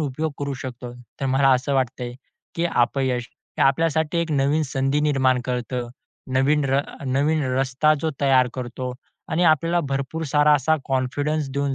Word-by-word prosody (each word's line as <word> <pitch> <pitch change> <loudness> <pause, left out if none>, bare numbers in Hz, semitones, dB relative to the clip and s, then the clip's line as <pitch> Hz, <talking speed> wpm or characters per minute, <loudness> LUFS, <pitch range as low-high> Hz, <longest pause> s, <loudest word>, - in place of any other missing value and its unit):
उपयोग 150 +1 -2
करू 140 -1 -3
शकतो. 125 -1 -7 0.3
तर 135 - 0
मला 135 +1 +3
असं 130 +2 0
वाटतं 130 -1 -1
आहे, 120 0 -6 0.4
की 170 - -1
अपयश 125 0 +1 0.3
हे - - +3
आपल्यासाठी 160 +3 +2
एक 170 -1 -1
नवीन 145 +3 +2
संधी 135 +1 0
निर्माण 130 -4 +2
करतो. 125 -1 -3 0.4
नवीन 140 +3 +2
र 135 +1 +3 0.3
नवीन 145 +4 +1
रस्ता 135 +3 +2
जो 160 +1 0
तयार 130 -2 +4
करतो 125 0 -5 0.4
आणि 165 +3 0
आपल्याला 165 +2 +3
भरपूर 140 +4 -3
सारा 150 0 +5
असा 155 +3 +2
कॉन्फिडन्स 140 +3 -1
देऊन 140 -1 -1
135 Hz, 160 wpm, -23 LUFS, 130-150 Hz, 0.4 s, सारा